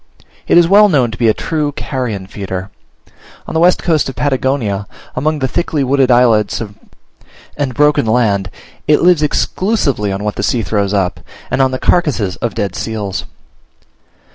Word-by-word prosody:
It - - +4
is 170 -1 +6
well 205 +3 +6
known 130 -9 +2
to 115 - -7
be 115 - +3
a 110 - +4
true 150 -3 -2
carrion 125 -10 -4
feeder. 95 0 -6 0.7
On - - -7
the 160 - +1
west 175 +2 +3
coast 160 -5 +1
of 135 - -7
Patagonia, 130 -8 -1 0.3
among 155 +4 0
the 135 -2 -1
thickly 150 +1 -1
wooded 135 0 +2
islets 120 -4 +3 1.0
and 140 -3 -2
broken 150 -4 +3
land, 105 -5 +1 0.4
it 150 +1 +3
lives 175 -3 +4
exclusively 150 - 0
on 95 +1 -4
what 105 0 -3
the - - -1
sea 120 -3 0
throws 100 -1 -1
up, 95 -3 -1 0.3
and - - +1
on 130 - +3
the 130 - -3
carcasses 130 - +1
of 120 - -3
dead 100 -3 -2
seals. 105 -4 -4
125 Hz, 165 wpm, -15 LUFS, 105-150 Hz, 1.0 s, is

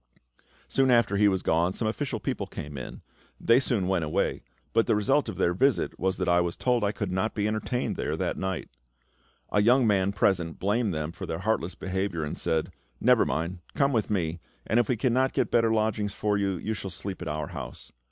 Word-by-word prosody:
Soon 135 -1 +2
after 115 -5 +4
he 105 +1 +5
was 95 -2 +1
gone 85 +3 +2
some 110 - -2
official 120 +1 -2
people - - -3
came 75 0 -7
in; 65 - -8 0.4
they 115 +2 +5
soon 115 -8 0
went 95 -3 +1
away, 80 +6 -1 0.3
but 115 0 +3
the - - +3
result 135 +8 +2
of - - -6
their 85 - +2
visit 125 -1 +1
was 95 +1 0
that 90 - -2
I 85 0 +4
was 85 -1 -2
told 125 -3 +1
I 100 - +2
could 100 -3 -4
not 95 +4 -1
be 105 -1 0
entertained 110 +3 -2
there - - -2
that - - -1
night. 95 -3 -3 0.8
A 105 - +3
young 125 +4 +5
man 100 -2 +2
present 90 -4 +1
blamed 105 +3 +1
them 80 -1 -3
for - - -7
their 80 - -3
heartless 95 -5 0
behaviour, 95 -3 -2
and 75 - -3
said, 80 -1 -1 0.3
"Never - - +4
mind, 85 +3 -2 0.2
come 140 -1 +2
with 110 -3 0
me; 85 -5 -1 0.3
and 115 - +2
if 120 - +1
we 125 - +1
cannot 130 +2 +2
get - - 0
better 115 -1 +3
lodgings 110 -2 0
for 105 0 0
you, 100 -2 0
you 110 +6 -3
shall 100 -2 -5
sleep 95 +2 -6
at 90 - -5
our 75 -1 -3
house." - - -8
100 Hz, 215 wpm, -27 LUFS, 90-115 Hz, 0.8 s, he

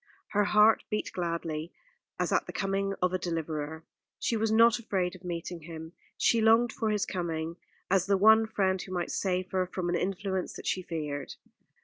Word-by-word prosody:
Her 205 0 +2
heart 210 +2 +5
beat 210 - -2
gladly, 170 -2 -3 0.5
as - - 0
at - - +1
the - - -5
coming 195 0 -1
of 180 0 +2
a 185 - 0
deliverer. 160 -2 -3 0.3
She 235 - -1
was 220 0 +1
not 230 +1 +5
afraid 190 -5 -1
of 185 - -14
meeting 175 0 -4
him. 160 +1 -9 0.2
She 230 - +3
longed 225 +1 +4
for 225 -3 -1
his 210 -1 +1
coming, 165 -2 -3 0.3
as 190 -1 +3
the 200 -1 +3
one 220 +2 +6
friend 190 -3 0
who 185 - -9
might 175 -2 -2
save 185 -1 -1
her 185 -1 0
from 180 -1 -3
an 175 - +1
influence 190 0 -2
that - - -9
she 185 - 0
feared. 150 -5 -4
185 Hz, 190 wpm, -29 LUFS, 170-210 Hz, 0.5 s, one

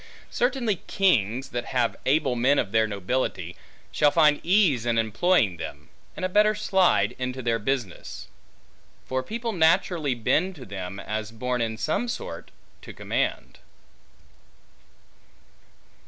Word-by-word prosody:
Certainly, 240 -5 0
kings 130 - +1
that 120 0 -4
have 125 - +1
able 135 -2 +2
men 130 +4 +3
of 100 - 0
their 110 0 +3
nobility, 100 -3 -2 0.4
shall 150 - +4
find 150 -1 +4
ease 170 - +3
in 120 -1 0
employing 110 - +2
them, 75 -2 -8 0.3
and - - -3
a - - +2
better 210 +3 +3
slide 185 - +2
into 130 0 -4
their 115 -1 +1
business; 115 -4 -4 0.8
for 130 0 -1
people 230 - -4
naturally 160 -4 +2
bend 175 - 0
to 135 -5 -10
them, 95 -1 -6
as 110 +1 -4
born 125 +2 -3
in 110 -1 -2
some 155 - -1
sort 475 - -6 0.3
to - - -10
command. - - -3
130 Hz, 130 wpm, -25 LUFS, 110-180 Hz, 0.8 s, shall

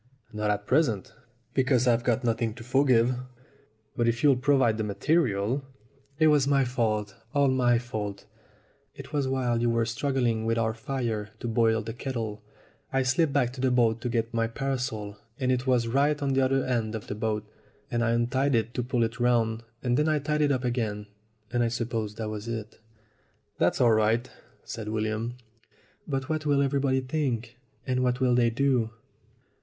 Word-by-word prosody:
"Not 105 0 -1
at 105 0 -1
present, 125 - +1 0.4
because 130 -2 +2
I've 120 -1 +3
got 125 0 +1
nothing 115 -1 0
to 120 - -10
forgive. 125 -1 +3 0.8
But 120 - +1
if 115 0 0
you'll 140 -3 +6
provide 130 -4 +2
the - - 0
material 110 +2 +1 0.3
" 140 0 -35
"It 155 - +4
was 150 -3 +4
my 140 -2 +3
fault 110 -5 -1 0.2
all 140 -1 +4
my 125 -2 +3
fault. 105 -4 -5 0.7
It - - -10
was 140 -2 +1
while 125 -3 0
you 120 - +2
were 115 0 +1
struggling 120 -1 0
with 115 +1 0
our 110 -1 +1
fire 110 -3 -3
to - - -4
boil 115 -1 +2
the 115 - -5
kettle. 115 -4 -4 0.5
I 135 0 +2
slipped 140 +4 +2
back 125 -3 +1
to 130 - -7
the 130 - +3
boat 115 -2 +2
to 125 - -2
get 115 0 -1
my 115 -1 +1
parasol, 115 -5 -3 0.2
and 130 -1 +1
it 125 +1 -1
was 125 -3 +2
right 140 +5 +2
at 140 -2 0
the 135 - +3
other 135 0 +2
end 115 -4 -1
of 110 - -6
the - - -4
boat; 110 0 -2 0.5
and 120 0 +1
I 115 - +2
untied 125 +4 +1
it 115 +1 0
to 125 - -1
pull 125 -1 0
it 115 +2 -3
round, 115 -2 +2 0.2
and 125 -1 +1
then 150 +1 +2
I 155 - +2
tied 150 +1 -1
it 145 -1 +3
up 130 -2 0
again, 110 -4 -2 0.5
and 120 - +2
I 120 - +3
suppose 115 -3 -3
that 110 -1 -4
was 105 +1 -5
it." 110 -2 -5 0.8
"That's - - +2
all 120 -2 +5
right," 110 +3 +2 0.4
said 110 -2 -6
William. 110 +2 -2 0.7
"But 135 -2 -2
what 155 -1 -2
will 140 -1 +3
everybody 135 -1 +1
think? 125 -4 -2 0.3
And 130 -1 0
what 125 0 +1
will 130 -2 +3
they 120 -1 +4
do?" 125 -2 +1
120 Hz, 190 wpm, -27 LUFS, 115-135 Hz, 0.8 s, you'll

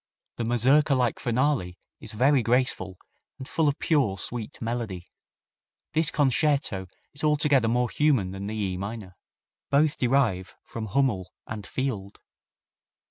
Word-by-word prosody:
The 115 - -2
mazurka 135 +5 +4
like 125 -3 0
finale 120 -7 0 0.2
is 110 - -6
very 130 +5 +3
graceful 115 -6 0 0.4
and 130 - -8
full 160 0 +1
of 145 - +1
pure, 135 - +1
sweet 115 +6 -6
melody. 115 -7 -4 0.9
This 160 0 +3
concerto 140 - +1 0.3
is 145 - -7
altogether 145 -5 +3
more 120 +2 +2
human 135 -12 +2
than 95 +1 -6
the 110 - -4
E 95 -4 -2
minor. 100 -1 -6 0.5
Both 145 +2 +2
derive 120 -8 +1
from 110 -1 -6
Hummel 105 -5 0
and 105 -2 -7
Field. 105 -7 -4
120 Hz, 135 wpm, -26 LUFS, 100-140 Hz, 0.9 s, mazurka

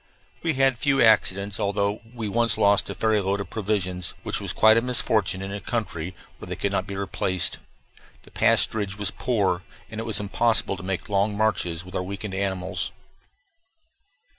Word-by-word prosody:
We 160 -3 0
had 135 -2 +3
few 140 0 +2
accidents, 100 -3 +3
although 100 +1 0
we 115 -3 -4
once 115 +1 +2
lost 100 +1 +3
a - - -4
ferry 110 -2 +2
load 100 +1 0
of 100 -3 -6
provisions, 95 -4 -2
which - - -1
was - - -3
quite 110 0 +6
a 115 - +4
misfortune 110 -6 0
in 95 - -5
a 100 - -4
country 95 -6 -3 0.2
where - - -9
they - - -4
could - - -1
not - - -1
be 100 - -5
replaced. 95 -2 -1 0.6
The - - -18
pasturage 100 -3 +3
was 100 -1 0
poor, 100 -7 0 0.3
and 110 - -5
it 115 - -3
was 110 - -2
impossible 110 +1 +1
to 95 - -9
make 95 -1 -3
long 100 0 +1
marches 90 -6 0
with 90 - -12
our 90 - -1
weakened 100 +2 -5
animals. 95 -2 -2
100 Hz, 180 wpm, -25 LUFS, 95-110 Hz, 0.6 s, quite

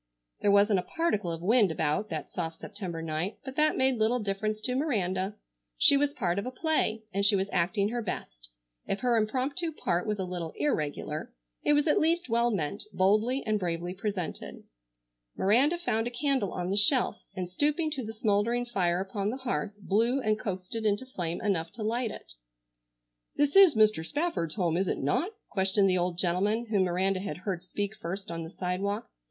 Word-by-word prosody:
There 205 - +3
wasn't 200 0 +5
a - - -8
particle 210 - +1
of 165 0 -5
wind 215 0 +4
about 160 +7 0
that - - -4
soft 165 -3 -4
September 175 -5 -5
night, 165 +5 -3
but 265 -1 -7
that 305 0 +3
made 260 -2 +2
little 220 +3 +3
difference 215 0 -2
to 250 +3 -1
Miranda. 200 - -1 0.4
She - - +7
was 285 +1 +2
part 195 -10 -1
of 200 - -4
a - - -3
play 255 -6 0
and 200 +1 0
she 205 +1 +5
was 195 +1 0
acting 195 +4 +1
her 240 +1 -2
best. - - -6 0.4
If 195 - -2
her 245 -2 +2
impromptu 265 +10 0
part 175 - -1
was 210 -1 0
a 190 - -2
little 175 -3 -5
irregular, 150 - -2 0.3
it 295 - +4
was 295 +2 +3
at 300 - +4
least 335 -1 +1
well 235 +1 +3
meant, 200 -1 -1
boldly 215 +8 +2
and 215 -1 +1
bravely 175 -1 -2
presented. 195 -2 -4 0.7
Miranda 260 - +3
found 230 -10 -1
a - - -1
candle 255 -5 0
on 180 0 -3
the 200 - 0
shelf 240 +5 +3 0.2
and, 185 -1 -3
stooping 300 - 0
to 275 -4 -3
the 220 - -5
smouldering 225 +2 +1
fire 185 -6 0
upon 195 +1 -2
the 250 - -3
hearth, 240 -5 -3
blew 225 +7 +1
and 215 -4 0
coaxed 185 -3 -4
it 225 -1 -2
into 210 +3 +1
flame 175 -9 -3
enough 170 -5 0
to 225 - -5
light 230 +2 0
it. - - -9 1.0
"This 290 +2 +1
is 390 -8 +8
Mr. 215 -6 +4
Spafford's 290 - -1
home, 175 -5 +1
is 190 +1 +1
it - - 0
not?" 225 - 0 0.2
questioned 195 +1 +2
the 185 -1 +3
old 175 -1 -1
gentleman 195 +6 +1
whom 195 -3 +3
Miranda 185 +2 +1
had 190 -6 -4
heard 185 -4 -2
speak 205 +3 -3
first 190 +1 -5
on 165 0 -4
the 165 - -6
sidewalk. 195 +4 -2
205 Hz, 195 wpm, -29 LUFS, 180-245 Hz, 1.0 s, is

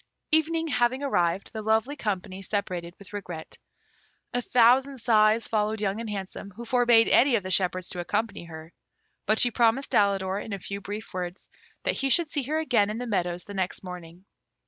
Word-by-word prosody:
Evening 325 +1 +2
having 250 +1 +1
arrived, 180 -8 0
the 220 - -4
lovely 220 +6 +1
company 195 -6 -4
separated 180 -4 -3
with 200 -1 -15
regret. 175 -6 -7 0.7
A 245 - 0
thousand 255 +3 +4
sighs 220 -1 +3
followed 215 0 0
Young 200 0 -1
and 230 - -5
Handsome, 195 -1 -6
who 235 - -8
forbade 240 -2 +4
any 260 0 +5
of 205 - 0
the 185 - -5
shepherds 185 -1 +2
to 180 - -2
accompany 205 +1 -2
her; 160 0 -11 0.5
but 215 +2 +3
she 245 - +5
promised 235 +4 +2
Alidor, 195 -1 +2
in 220 - -7
a - - -2
few 200 +2 -6
brief 205 +2 -7
words, 180 0 -5 0.4
that - - 0
he 270 - 0
should 330 +2 +3
see 290 - 0
her 295 +5 -2
again 235 -10 +2
in 215 - -3
the 245 - -4
meadows 180 -5 -2
the 205 - -9
next 190 -1 -3
morning. 180 0 -10
210 Hz, 190 wpm, -26 LUFS, 185-240 Hz, 0.7 s, any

